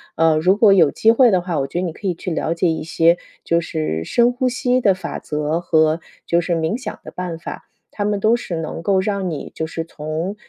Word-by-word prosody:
呃， 165 Hz, -1 st, +3 dB
如 185 Hz, +5 st, +3 dB
果 210 Hz, -2 st, +6 dB
有 165 Hz, -6 st, +5 dB
机 220 Hz, +10 st, +3 dB
会 245 Hz, +1 st, +5 dB
的 185 Hz, -4 st, +2 dB
话， 175 Hz, -4 st, -2 dB
我 135 Hz, -, -1 dB
觉 140 Hz, -, -6 dB
得 180 Hz, -, 0 dB
你 165 Hz, -, -4 dB
可 200 Hz, -, -6 dB
以 180 Hz, -, 0 dB
去 180 Hz, -, -5 dB
了 160 Hz, 0 st, -1 dB
解 175 Hz, +2 st, +1 dB
一 160 Hz, -, -3 dB
些 165 Hz, +1 st, +3 dB, 0.2 s
就 170 Hz, 0 st, +1 dB
是 155 Hz, -, -3 dB
深 240 Hz, -, +3 dB
呼 255 Hz, 0 st, 0 dB
吸 250 Hz, 0 st, 0 dB
的 200 Hz, -5 st, +4 dB
法 180 Hz, -2 st, -6 dB
则 150 Hz, +2 st, -2 dB
和 160 Hz, -1 st, +2 dB, 0.3 s
就 170 Hz, 0 st, +2 dB
是 175 Hz, +1 st, -1 dB
冥 165 Hz, +4 st, -1 dB
想 260 Hz, -, -7 dB
的 -, -, -9 dB
办 180 Hz, -2 st, -5 dB
法， -, -, -8 dB, 0.3 s
它 205 Hz, -, -1 dB
们 205 Hz, -1 st, 0 dB
都 220 Hz, +3 st, +3 dB
是 190 Hz, -7 st, -4 dB
能 160 Hz, 0 st, -4 dB
够 190 Hz, +1 st, +2 dB
让 195 Hz, -2 st, -1 dB
你 155 Hz, -4 st, -6 dB
就 160 Hz, -, -2 dB
是 165 Hz, 0 st, -4 dB
从， 160 Hz, +5 st, -4 dB
175 Hz, 265 characters per minute, -20 LUFS, 160-200 Hz, 0.3 s, 果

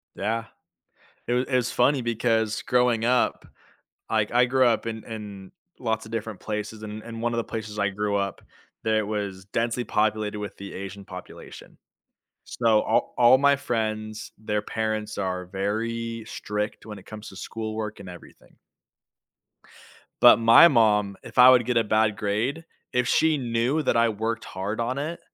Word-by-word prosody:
Yeah, 115 Hz, +3 st, -2 dB, 0.8 s
it 120 Hz, -, +1 dB
was 125 Hz, +1 st, +1 dB
it 130 Hz, -, -1 dB
was 125 Hz, -1 st, +1 dB
funny 140 Hz, -2 st, +2 dB
because 115 Hz, -2 st, 0 dB
growing 125 Hz, -2 st, +2 dB
up, 125 Hz, +1 st, +1 dB, 0.6 s
like 110 Hz, -1 st, +1 dB
I 125 Hz, +1 st, +5 dB
grew 130 Hz, +1 st, +3 dB
up 115 Hz, -2 st, +1 dB
in 110 Hz, -1 st, -5 dB
in 105 Hz, -4 st, -8 dB, 0.3 s
lots 110 Hz, -2 st, -2 dB
of 110 Hz, -, -12 dB
different 110 Hz, -3 st, -4 dB
places 105 Hz, 0 st, -5 dB
and 110 Hz, 0 st, -7 dB
and 115 Hz, -1 st, -8 dB
one 120 Hz, 0 st, 0 dB
of 115 Hz, -, -1 dB
the 115 Hz, -, -1 dB
places 110 Hz, -2 st, -6 dB
I 100 Hz, 0 st, +2 dB
grew 100 Hz, 0 st, -1 dB
up 100 Hz, -1 st, -3 dB, 0.4 s
it 110 Hz, -1 st, +1 dB
was 100 Hz, -3 st, -4 dB
densely 115 Hz, +3 st, -1 dB
populated 105 Hz, -1 st, 0 dB
with 105 Hz, -2 st, -6 dB
the 100 Hz, 0 st, -9 dB
Asian 100 Hz, +1 st, -7 dB
population, -, -, -11 dB, 0.7 s
so 115 Hz, -3 st, +2 dB
all 110 Hz, -, 0 dB
all 120 Hz, +1 st, +7 dB
my 140 Hz, 0 st, +5 dB
friends 110 Hz, -5 st, -3 dB
their 105 Hz, -1 st, -2 dB
parents 110 Hz, 0 st, -3 dB
are 90 Hz, -2 st, -2 dB
very 115 Hz, +4 st, -3 dB
strict 105 Hz, +1 st, -4 dB
when 105 Hz, -2 st, -8 dB
it 95 Hz, -, -15 dB
comes 110 Hz, 0 st, -9 dB
to 95 Hz, -, -12 dB
schoolwork 110 Hz, 0 st, -5 dB
and 95 Hz, -, -9 dB
everything. 90 Hz, -1 st, -14 dB, 1.7 s
But -, -, +8 dB
my 115 Hz, +8 st, +8 dB
mom, 105 Hz, -, +3 dB
if -, -, -12 dB
I 125 Hz, 0 st, +9 dB
would 125 Hz, -2 st, +5 dB
get 120 Hz, 0 st, +1 dB
a 115 Hz, -, +4 dB
bad 110 Hz, 0 st, +2 dB
grade 115 Hz, +10 st, -2 dB, 0.3 s
if 125 Hz, -1 st, +1 dB
she 160 Hz, +2 st, +3 dB
knew 120 Hz, +5 st, 0 dB
that 125 Hz, -, +1 dB
I 115 Hz, 0 st, +4 dB
worked 110 Hz, +2 st, -3 dB
hard 100 Hz, +4 st, -4 dB
on 125 Hz, +3 st, -1 dB
it, 160 Hz, +4 st, -4 dB
110 Hz, 170 wpm, -25 LUFS, 105-120 Hz, 1.7 s, I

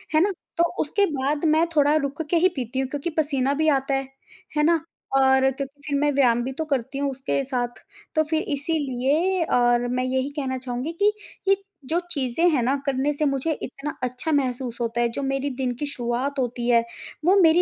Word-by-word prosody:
है 310 Hz, -, +6 dB
ना? 400 Hz, +2 st, +3 dB, 0.3 s
तो 340 Hz, -, +5 dB, 0.2 s
उसके 400 Hz, +7 st, +2 dB
बाद 290 Hz, +3 st, -1 dB
मैं 315 Hz, +2 st, +4 dB
थोड़ा 290 Hz, 0 st, +4 dB
रुक 280 Hz, +1 st, -1 dB
के 340 Hz, -, +4 dB
ही 365 Hz, +3 st, +5 dB
पीती 260 Hz, 0 st, -3 dB
हूँ, 265 Hz, -1 st, -1 dB
क्योंकि 290 Hz, +4 st, -3 dB
पसीना 280 Hz, -3 st, +2 dB
भी 315 Hz, +2 st, +1 dB
आता 275 Hz, -1 st, +1 dB
है, 270 Hz, 0 st, -2 dB, 0.5 s
है 300 Hz, -, +4 dB
ना? 330 Hz, 0 st, +3 dB, 0.4 s
और 265 Hz, 0 st, +5 dB
क्योंकि 275 Hz, +2 st, -7 dB
फिर 285 Hz, -, 0 dB
मैं 290 Hz, 0 st, +2 dB
व्यायाम 240 Hz, -3 st, +3 dB
भी 265 Hz, -, -3 dB
तो 320 Hz, +4 st, -3 dB
करती 275 Hz, -2 st, -2 dB
हूँ, 280 Hz, 0 st, 0 dB
उसके 270 Hz, +1 st, -1 dB
साथ। 245 Hz, -2 st, -3 dB, 0.3 s
तो 315 Hz, -, +4 dB
फिर 315 Hz, +1 st, 0 dB
इसीलिए 295 Hz, +4 st, 0 dB
और 240 Hz, 0 st, +3 dB
मैं 250 Hz, +1 st, 0 dB
यही 260 Hz, +1 st, 0 dB
कहना 270 Hz, -3 st, -2 dB
चाहूँगी 250 Hz, +4 st, -4 dB
कि 415 Hz, +1 st, +5 dB, 0.3 s
ये 390 Hz, -, +6 dB, 0.3 s
जो 325 Hz, +6 st, +1 dB
चीज़ें 280 Hz, +4 st, +2 dB
हैं 275 Hz, -6 st, +2 dB
ना, 265 Hz, +4 st, +2 dB
करने 275 Hz, +1 st, +1 dB
से 300 Hz, +1 st, 0 dB
मुझे 275 Hz, +3 st, 0 dB
इतना 275 Hz, +3 st, -5 dB
अच्छा 250 Hz, +5 st, -1 dB
महसूस 255 Hz, -4 st, -1 dB
होता 235 Hz, 0 st, 0 dB
है, 235 Hz, -, +2 dB
जो 275 Hz, +5 st, -4 dB
मेरी 270 Hz, +1 st, -1 dB
दिन 255 Hz, -1 st, -1 dB
की 295 Hz, -, -3 dB
शुरुआत 265 Hz, +1 st, -2 dB
होती 245 Hz, -1 st, -2 dB
है, 235 Hz, -1 st, +5 dB, 0.4 s
वो 370 Hz, +3 st, +6 dB
मेरी 330 Hz, +1 st, +6 dB
275 Hz, 210 wpm, -24 LUFS, 255-300 Hz, 0.5 s, है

